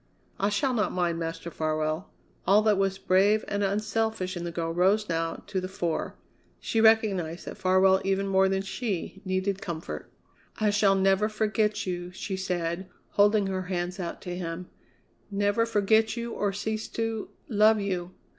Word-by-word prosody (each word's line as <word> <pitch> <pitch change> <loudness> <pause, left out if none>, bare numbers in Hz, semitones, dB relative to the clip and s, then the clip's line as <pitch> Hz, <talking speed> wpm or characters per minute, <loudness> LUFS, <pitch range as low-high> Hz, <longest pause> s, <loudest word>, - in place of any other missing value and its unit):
"I 200 - +2
shall 255 +6 +1
not 210 -5 +1
mind, 175 -2 0
Master 165 +1 -4
Farwell." 155 +3 -1 0.4
All 205 +3 +6
that 210 -2 +3
was 195 -1 +1
brave 195 +3 +3
and 205 0 -1
unselfish 210 -1 -1
in 175 0 -4
the 170 - -3
girl 165 -1 -2
rose 195 +5 +3
now 165 -1 -2
to 190 -2 -2
the 185 - -3
fore. 175 -3 -2 0.4
She 225 - 0
recognized 200 -7 +3
that - - -6
Farwell, 190 +1 +4
even 195 0 0
more 190 0 +4
than 190 0 0
she, 195 -2 -4
needed 190 +1 -1
comfort. 170 -4 -6 0.5
"I 215 -1 +3
shall 205 -1 +4
never 195 +2 +3
forget 215 0 0
you," 175 -1 -4
she 190 +1 -4
said, 180 -1 -2 0.2
holding 205 0 +4
her 190 -1 -2
hands 180 +1 -2
out 175 -2 -5
to 180 -2 -4
him; 175 0 -5 0.6
"never 205 +3 +1
forget 220 +1 +2
you 235 0 -4
or 205 -1 0
cease 215 +2 -3
to 225 -1 -3 0.2
love 215 -1 +4
you!" 185 -3 -3
195 Hz, 165 wpm, -27 LUFS, 180-210 Hz, 0.6 s, All